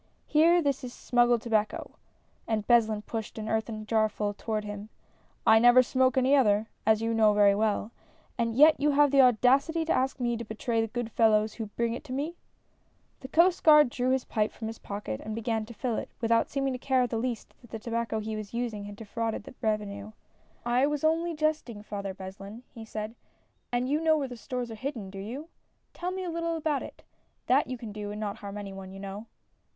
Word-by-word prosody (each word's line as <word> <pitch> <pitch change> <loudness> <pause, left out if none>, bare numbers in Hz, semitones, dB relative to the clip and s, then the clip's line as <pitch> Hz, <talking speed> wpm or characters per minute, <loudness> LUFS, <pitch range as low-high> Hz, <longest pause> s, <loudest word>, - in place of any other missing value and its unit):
Here, 335 +3 +4
this 280 -2 0
is 245 -1 -6
sinnggiecl 240 -1 +2
tobacco, 215 -2 -1 0.6
(and 215 -2 -1
Beslin 220 -3 +3
pushed 225 0 -6
an 215 0 -5
earthen 220 -1 -2
jarfull 215 -2 0
toward 215 -1 -3
him) 205 0 -7 0.6
I 220 - +7
never 245 +2 +7
smoke 260 +1 +2
any 260 +2 +4
other, 215 -5 +3 0.2
as 220 0 +4
you 230 0 0
know 215 -2 +4
very 205 -1 +5
well, 210 +1 0 0.4
and 230 -1 -1
yet 305 +2 +7
you 295 +1 +2
have 290 0 +4
the 275 -1 +6
audacity 265 +7 +3
to 325 - +1
ask 265 +1 0
me 240 -1 0
to 235 - -5
betray 225 +1 -2
the 225 - -1
good 235 0 -4
fellows 215 -1 +3
who 225 -2 -5
bring 230 +3 -2
it 240 - -6
to 255 - -6
me! 295 +6 -3 0.4
" - - -40
The 260 - -8
Coast 345 +6 +3
Guard 300 -5 +7
drew 250 +1 -1
his 260 -1 +1
pipe 215 -1 0
from 225 - -8
his 225 - -8
pocket 200 - -5
and 215 0 -5
began 225 -1 -2
to 235 - -9
fill 240 -2 -2
it, - - -4
without 230 0 +2
seeming 275 -1 -1
to 250 - -5
care 260 -1 +2
in - - 0
the 230 - -3
least 235 -1 -4
that 240 - -17
the 225 - -5
tobacco 230 0 -2
he 220 0 -4
was 215 +1 -7
using 225 -4 -3
had 205 0 -8
defrauded 225 +1 -4
the - - -11
revenue. 215 -1 -2 0.3
" - - -35
I 275 - +4
was 295 0 -2
only 330 +2 +1
jesting. 300 -9 -1
Father 200 -2 -5
Beslin," 195 +4 -9
he 225 -1 -9
said. 215 0 -5 0.3
" - - -44
And 245 +1 0
you 295 +3 0
know 320 -1 +4
where 270 -4 -3
stores 245 0 -5
are - - -5
hidden, 225 -4 -5
do 195 - -8
you? 255 +11 -7 0.4
Tell 355 - -4
me 375 0 -4
a 355 - -3
little 335 0 -2
about 305 -3 -1
it, - - -10 0.2
— - - -44
that - - +3
you 255 - -4
can 230 -3 -8
do 205 0 -6
and 210 +1 -6
not 205 -2 -3
harm 200 0 -7
any 200 -1 -6
one, 195 -1 -9
you 195 - -10
know." 200 +3 -7
230 Hz, 225 wpm, -28 LUFS, 215-265 Hz, 0.6 s, I